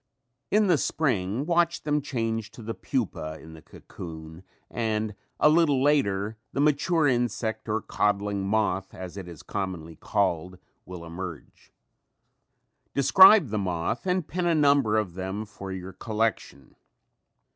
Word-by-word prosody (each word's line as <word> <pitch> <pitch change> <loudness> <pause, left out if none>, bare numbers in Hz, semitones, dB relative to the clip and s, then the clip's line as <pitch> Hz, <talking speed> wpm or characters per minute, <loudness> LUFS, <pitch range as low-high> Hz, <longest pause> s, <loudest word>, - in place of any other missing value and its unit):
In 210 +1 +3
the 175 -6 +3
spring 120 -4 0
watch 170 0 +1
them 150 0 0
change 115 -5 -3
to 115 - -11
the 115 +1 -4
pupa 80 -5 -3
in 80 0 -12
the 80 - -12
cocoon 80 0 -10 0.3
and 110 -2 -2 0.3
a - - +5
little 150 -3 +4
later 110 -8 +1 0.2
the - - -2
mature 150 +2 +2
insect 115 -3 -1
or 110 0 -1
codling 100 -1 0
moth, 100 -2 0
as 95 -2 -8
it 95 -3 -7
is 85 -3 -11
commonly 85 -5 -5
called, 90 -2 -1 0.3
will 90 -2 -8
emerge. 85 -2 -9 1.2
Describe 190 - +7
the 105 0 -1
moth 90 - -2
and 180 -3 0
pin 180 -1 -2
a 170 - +3
number 140 -7 +3
of 100 -5 -1
them 95 +4 -4
for 100 -2 -9
your 95 0 -7
collection. 110 - -3
110 Hz, 140 wpm, -26 LUFS, 95-140 Hz, 1.2 s, Describe